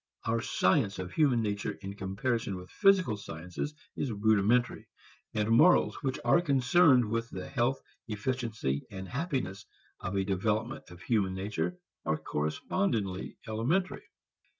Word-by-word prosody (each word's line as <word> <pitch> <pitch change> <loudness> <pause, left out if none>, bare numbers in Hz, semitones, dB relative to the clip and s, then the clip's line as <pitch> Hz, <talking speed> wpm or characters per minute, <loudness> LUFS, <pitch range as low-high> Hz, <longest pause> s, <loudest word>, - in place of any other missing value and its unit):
Our 115 0 +1
science 100 +1 +2
of 90 -1 -5
human 135 -7 +3
nature 105 0 -2
in 100 +1 -5
comparison 100 +2 -2
with 90 0 -10
physical 190 - +4
sciences 90 - -6 0.2
is 135 - -2
rudimentary, 110 +3 +2 0.5
and 105 0 +1
morals 155 +10 +5
which 135 -3 -1
are 120 +8 +5
concerned 140 -2 +4
with 115 +2 -2
the 95 -1 -6
health, 130 0 0 0.3
efficiency 110 - -2
and 95 -2 -7
happiness 125 - -3 0.4
of 95 0 -4
a 95 - +2
development 105 +5 -1
of 90 +1 -12
human 100 -5 +1
nature 105 - -2 0.3
are 80 - 0
correspondingly 95 - -2
elementary. 135 - -1
110 Hz, 130 wpm, -30 LUFS, 95-130 Hz, 0.5 s, morals